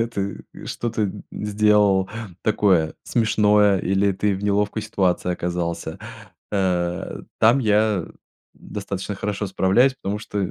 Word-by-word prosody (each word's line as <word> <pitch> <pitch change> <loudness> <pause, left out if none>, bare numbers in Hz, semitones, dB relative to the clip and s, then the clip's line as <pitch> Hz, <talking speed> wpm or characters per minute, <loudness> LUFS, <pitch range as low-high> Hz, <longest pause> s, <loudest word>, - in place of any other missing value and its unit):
когда 115 - +1
ты, 100 -4 -4
э, - - -10
что-то 110 -4 -2 0.2
сделал 105 -2 +2 0.3
такое 95 -7 +2
смешное, 105 -3 +3
или 95 +2 +1
ты 100 +2 0
в 95 - -6
неловкой 105 +1 0
ситуации 90 -3 0
оказался. 85 -1 -3 0.5
Э, 90 -3 -1 0.2
там 115 +5 +5
я 105 -4 +2 0.5
достаточно 100 0 -5
хорошо 100 +1 -3
справляюсь, 95 +8 +3
потому 105 -5 -4
что 105 -1 -5
100 Hz, 120 wpm, -22 LUFS, 95-105 Hz, 0.5 s, там